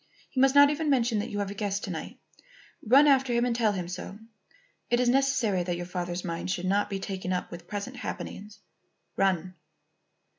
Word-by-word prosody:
He 260 - 0
must 270 +1 +4
not 285 0 +8
even 300 +1 -1
mention 240 -5 +2
that 215 +4 -3
you 205 - -5
have 200 -1 -2
a - - -5
guest 200 -1 -2
to - - -4
night. - - -6 0.7
Run 265 +6 +6
after 270 -3 +4
him 235 +1 +2
and 240 -1 0
tell 225 -3 +2
him 180 -3 -4
so. 185 +2 -7 0.7
It 240 - +2
is 250 - +2
necessary 250 -7 +2
that 175 0 -2
your 175 - -5
father's 180 0 -4
mind 170 +1 -4
should 185 -1 -2
not 200 +2 +1
be 195 - -2
taken 190 -1 -4
up 180 -1 -2
with 170 0 -9
present 210 +5 -5
happenings. 210 -3 -7 0.6
Run." 185 -2 +1
205 Hz, 200 wpm, -28 LUFS, 185-250 Hz, 0.7 s, not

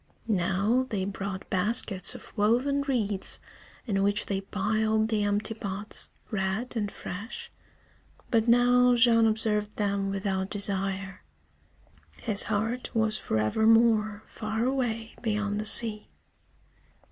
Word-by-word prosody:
Now 205 +5 +1
they 195 -5 -2
brought 195 -1 -5
baskets 195 -1 +3
of - - -13
woven 250 +7 +2
reeds 220 -8 0 0.5
in 200 -5 0
which 205 +1 +2
they 195 -1 -2
piled 215 +2 0
the 215 -2 0
empty 205 +2 0
pots, 210 -2 -5 0.2
red 210 +4 -2
and 210 -3 -2
fresh. 205 +6 -8 0.8
But 225 -2 +2
now 245 +1 +5
Jean 230 -1 +5
observed 215 -1 -1
them 200 -1 -1
without 195 -1 -2
desire. 195 -1 -1 1.0
His 210 -3 +1
heart 225 +4 -2
was 220 -1 +1
forevermore 220 - +2
far 220 +1 -4
away 240 -4 -2
beyond 210 -2 -1
the 215 - -4
sea. 215 -2 +2
215 Hz, 115 wpm, -27 LUFS, 200-225 Hz, 1.0 s, now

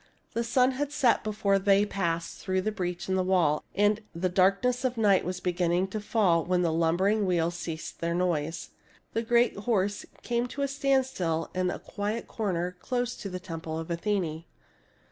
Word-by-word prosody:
The 235 - 0
sun 250 +2 +3
had 280 +2 -3
set 280 -5 +3
before 205 -2 +1
they 200 +1 +4
passed 170 -5 -2
through 185 0 0
the 215 - -1
breach 180 -4 -4
in 190 - 0
the 190 - +2
wall; 175 -5 +2
and 205 +2 +3
the 180 +2 0
darkness 195 +8 +2
of 250 -2 0
night 205 -4 +4
was 180 +1 -3
beginning 180 +1 0
to 215 - -3
fall 200 -6 +2
when 180 +1 +1
the 165 -2 +1
lumbering 185 +6 +2
v/heels 170 -1 +1
ceased 165 -2 -6
their 170 0 -1
noise. 165 -3 -1 0.4
The 225 - +1
great 235 +1 +3
horse 200 -1 -1 0.2
came 240 0 0
to 280 +3 -4
a - - +1
standstill 265 - 0
in 185 0 0
a - - -3
quiet 210 +3 -4
corner 180 -4 -2
close 245 -1 -2
by 200 - -4
the 185 0 -5
temple 165 -3 -5
of 165 +1 -5
Athene. 170 -3 -1
190 Hz, 185 wpm, -28 LUFS, 175-220 Hz, 0.4 s, they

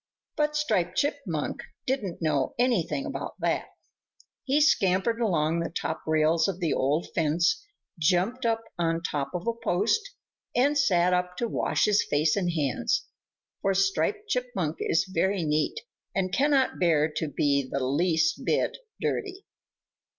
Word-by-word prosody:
But 300 0 0
Striped 185 - 0
Chipmunk 275 - -1 0.2
didn't 215 -11 -2
know 145 -4 0
anything 200 - +1
about - - -5
that. - - 0 0.8
He 280 +2 +2
scampered 230 - +2
along 165 -6 +1
the 170 - -2
top 160 -1 -3
rails 160 +1 +3
of 190 -2 -3
the 170 -4 0
old 145 +5 +1
fence, 170 - +1 0.4
jumped 185 - +1
up 225 -1 +1 0.2
on 165 0 0
top 145 -5 -2
of 180 - -4
a 235 - +1
post, 225 - +1 0.5
and 280 +4 +3
sat 180 -11 +3
up 180 0 -1
to 235 - -1
wash - - +1
his 210 -1 +3
face 150 +1 +1
and 180 -3 0
hands, 145 -7 0 0.6
for 195 0 +1
Striped 195 - +1
Chipmunk 240 - -2
is 165 - +1
very 190 0 0
neat 155 - 0 0.4
and 185 -1 -1
cannot 275 -2 +2
bear 160 -4 +3
to 160 - -1
be 140 -1 0
the 140 - -1
least 170 - +1
bit - - 0 0.2
dirty. 390 -1 -3
180 Hz, 145 wpm, -27 LUFS, 160-240 Hz, 0.8 s, rails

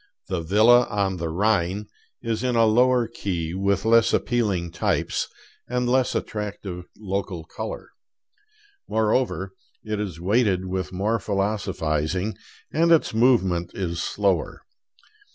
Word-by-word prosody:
'The 95 -3 -1
Villa 110 +8 +5
on 100 -3 0
the 85 -1 -3
Rhine' 100 +2 +1 0.4
is 115 0 -2
in 125 -1 0
a 115 -1 +5
lower 120 +2 +4
key, 90 -7 -3
with 100 +2 0
less 115 0 +4
appealing 100 -8 0
types, - - -1 0.4
and 125 0 -1
less 130 +1 +2
attractive 100 -4 -4
local 100 -4 -3
color. - - -7 1.0
Moreover, 110 -3 0 0.3
it 105 -1 -3
is 95 -6 -4
weighted 95 0 +2
with 95 0 -3
more 105 +5 0
philosophizing, 95 -3 -1 0.4
and 165 +2 +3
its 165 -7 +4
movement 105 -8 +2
is 85 -3 -2
slower. 100 -3 -1
100 Hz, 120 wpm, -24 LUFS, 90-115 Hz, 1.0 s, Villa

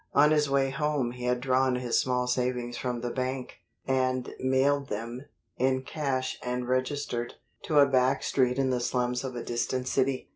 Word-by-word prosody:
On 150 +2 +6
his 150 -2 +3
way 135 -1 +2
home 140 -3 0
he 125 0 -7
had 125 0 +1
drawn 130 0 +2
his 125 -1 +1
small 125 -1 +1
savings 125 -1 -1
from 125 -1 -3
the 120 0 -3
bank, 130 0 -4 0.3
and 130 -1 0
mailed 135 +2 +2
them, 115 +5 -5 0.3
in 130 +1 +1
cash 130 -3 -2
and 125 0 -3
registered, 130 -1 -1 0.3
to 155 - +1
a 145 - +8
back 130 0 +2
street 125 -1 +1
in 135 -1 +1
the 125 - +1
slums 125 0 -1
of 130 -2 -5
a 120 - -4
distant 125 +2 -2
city. 130 0 0
130 Hz, 180 wpm, -28 LUFS, 125-135 Hz, 0.3 s, a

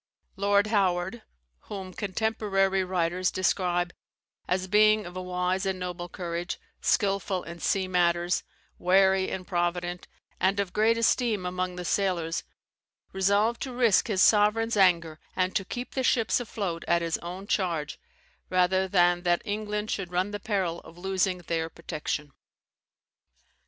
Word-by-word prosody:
Lord 200 0 +3
Howard 190 0 0 0.4
(whom 190 -2 -7
contemporary 195 -2 0
writers 180 0 0
describe 175 -1 0 0.5
as 185 +1 0
being 215 +2 +4
of 175 +1 -9
a 185 - -4
wise 180 +1 -1
and 190 -1 -1
noble 180 -1 -5
courage, 175 0 -4 0.2
skilful 195 -2 +1
in 170 0 -9
sea 190 +2 0
matters, 175 -1 +2 0.4
wary 190 +1 +4
and 185 -1 -5
provident, 175 0 -2 0.3
and 195 +2 +2
of 195 -3 -2
great 225 +2 +3
esteem 230 -4 +1
among 180 0 -2
the 180 0 -6
sailors) 175 -4 0 0.7
resolved 200 +4 +2
to 260 - -4
risk 235 -5 +3
his 195 -5 +3
sovereign's 220 +2 +4
anger, 170 -5 +3 0.2
and 185 0 0
to 195 - +1
keep 245 +6 -6
the 265 - -1
ships 235 -2 +2
afloat 200 -8 -4
at 170 0 +2
his 165 -1 -1
own 180 +3 -7
charge, 175 - -1 0.5
rather 185 +1 +2
than 175 -2 +3
that 175 -1 +1
England 210 0 -3
should 185 -3 -3
run 185 +3 0
the 205 - -4
peril 190 -5 -1
of 165 - -15
losing 190 0 0
their 165 0 -1
protection. 150 -3 -4
185 Hz, 140 wpm, -27 LUFS, 175-205 Hz, 0.7 s, being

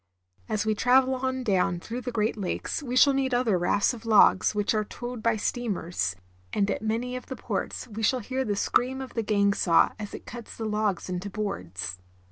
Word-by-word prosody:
As 215 0 0
we 215 - +2
travel 255 +4 +4
on 260 0 -2
down 190 -4 +1
through 235 +7 -5
the 250 - -4
Great 220 -1 0
Lakes 205 - -3
we 250 -3 -4
shall 280 +2 +6
meet 265 -2 +1
other 240 -5 +2
rafts 180 +6 +2
of 230 -2 -9
logs, 215 -3 +5
which 205 +1 +1
are 215 -1 +1
towed 240 +2 -7
by 230 0 +2
steamers; 185 - -2 0.4
and 200 0 +1
at - - -2
many 230 +3 -2
of 250 - -7
the 260 - -5
ports - - -4
we 220 -1 -6
shall 255 +4 +3
hear 260 +4 -2
the 210 -4 -1
scream 255 +6 +1
of 265 -1 -7
the 230 - 0
gang 200 -2 +2
saw 170 -4 +4
as 205 -1 -6
it - - -10
cuts 240 -2 -9
the 225 - -4
logs 210 -3 -1
into 185 +2 -4
boards. 90 - -4
220 Hz, 210 wpm, -27 LUFS, 200-250 Hz, 0.4 s, shall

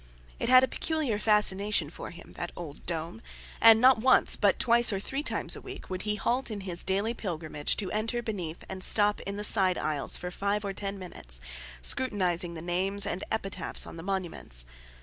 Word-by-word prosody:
It - - -1
had 255 0 +7
a - - +3
peculiar 305 -11 -2
fascination 205 -6 +3
for - - -8
him, 175 - -13
that 175 - -6
old 155 -4 -10
dome, 170 +4 -5 0.4
and 225 -1 +8
not 255 0 +5
once, 255 +3 +3
but 200 -2 +2
twice 235 -1 +3
or 195 - -2
three 270 +8 -4
times - - +2
a - - -10
week, - - -10
would 185 0 -4
he 210 +1 -2
halt 245 +6 -1
in 210 -2 -6
his 180 -3 -4
daily 200 +4 -1
pilgrimage 160 -8 -4
to 195 -4 -3
enter 225 +3 -2
beneath 180 -8 -5
and 190 -1 -2
stop 205 -1 +6
in 200 0 -4
the 210 - -4
side 190 -4 +4
aisles 150 -2 -1
for 180 - -6
five 200 +3 -2
or 195 - -3
ten 200 0 -4
minutes, - - -6 0.4
scrutinizing 180 - -1
the 160 - -8
names 190 +3 +2
and 185 - -4
epitaphs 195 -4 -2
on - - -10
the - - -7
monuments. 175 - -2
195 Hz, 195 wpm, -28 LUFS, 175-220 Hz, 0.4 s, and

